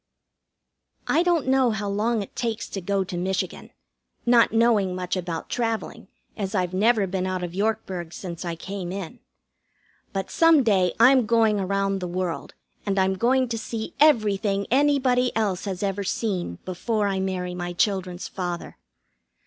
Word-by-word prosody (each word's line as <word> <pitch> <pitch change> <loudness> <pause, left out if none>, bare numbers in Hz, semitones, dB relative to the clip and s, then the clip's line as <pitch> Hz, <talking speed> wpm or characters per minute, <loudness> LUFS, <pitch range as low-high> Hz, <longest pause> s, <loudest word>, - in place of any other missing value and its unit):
I 330 - +3
don't 345 -5 +2
know 260 -1 +3
how 210 -2 -2
long 210 +2 0
it - - -14
takes 230 -2 -2
to 195 - -5
go 195 +2 0
to 185 -1 -7
Michigan, 185 +2 -3 0.6
not 240 -1 +5
knowing 225 -5 +3
much 180 0 -2
about 175 -3 -4
travelling, 225 -2 -3 0.3
as 200 -1 -3
I've 180 -1 0
never 210 +2 +3
been 185 0 -2
out 185 -1 -2
of 175 -1 -5
Yorkburg 190 -4 -2
since 175 -1 -7
I 170 -2 -3
came 185 +1 -6
in. 195 +4 -6 0.9
But 195 -1 -4
some 330 -4 +5
day 190 -6 +2
I'm 250 0 +6
going 225 -2 +3
around 195 0 0
the 180 - -4
world, 180 -1 -4 0.3
and 200 -1 -1
I'm 190 0 +3
going 255 +6 +2
to 230 -1 -2
see 220 0 -5
everything 205 -8 +3
anybody 260 -2 +3
else 205 -4 0
has 190 -1 -4
ever 200 0 -1
seen 185 - -2
before 205 +4 -1
I 195 -1 -1
marry 185 -1 -2
my 175 0 -4
children's 180 -1 -1
father. 175 -2 -5
200 Hz, 160 wpm, -24 LUFS, 185-230 Hz, 0.9 s, I'm